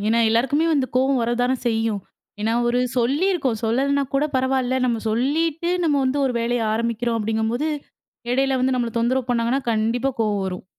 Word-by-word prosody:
ஏன்னா, 230 +1 +3
எல்லாருக்குமே 270 +8 +2
வந்து 275 -3 +1
கோவம் 265 0 +2
வரத்தான 245 +2 +1
செய்யும். 225 -3 0 0.4
ஏன்னா, 220 +2 0 0.2
ஒரு 245 +1 +1 0.2
சொல்லிருக்கோம். 270 - +1
சொல்லலன்னா 275 +5 +1
கூட 275 - +2
பரவாயில்ல. 260 0 +1
நம்ம 235 -2 0
சொல்லிட்டு, 310 +8 0
நம்ம 300 -3 +2
வந்து 260 +2 0
ஒரு 255 - -1
வேலைய 235 0 0
ஆரம்பிக்கிறோம். 235 +1 -1
அப்பிடீங்கம்போது, 225 +6 -1 0.6
இடையில 270 +1 +2
வந்து 260 +1 +2
நம்மள 240 -2 -1
தொந்தரவு 250 +2 0
பண்ணாங்கன்னா, 240 +2 +1
கண்டிப்பா 230 +4 0
கோவம் 210 -3 0
வரும். 185 -1 -6
245 Hz, 155 wpm, -22 LUFS, 230-270 Hz, 0.6 s, ஏன்னா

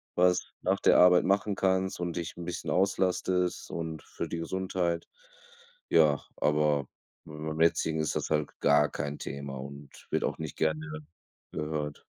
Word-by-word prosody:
was 90 0 +3 0.2
nach - - +2
der - - +6
Arbeit 90 0 +7
machen 100 +1 +1
kannst 95 -1 +1
und 85 -1 -3
dich 85 -1 -4
'n 85 - -7
bisschen 90 - -4
auslastest 90 -1 +1
und 80 -3 -4
für - - -5
die 85 - -4
Gesundheit. 90 0 -1 0.8
Ja, 75 -2 +5 0.2
aber 75 -2 +2 0.4
beim 75 +1 -5
jetzigen 80 -1 +2
ist 75 - -1
das - - -2
halt 75 -2 +1
gar 75 +1 +5
kein 70 +1 -4
Thema 70 0 -5
und 70 0 -11
wird - - +1
auch - - -2
nicht 80 -2 -6
gerne 80 -1 0 0.7
gehört. 75 -1 -3
80 Hz, 155 wpm, -29 LUFS, 75-90 Hz, 0.8 s, Arbeit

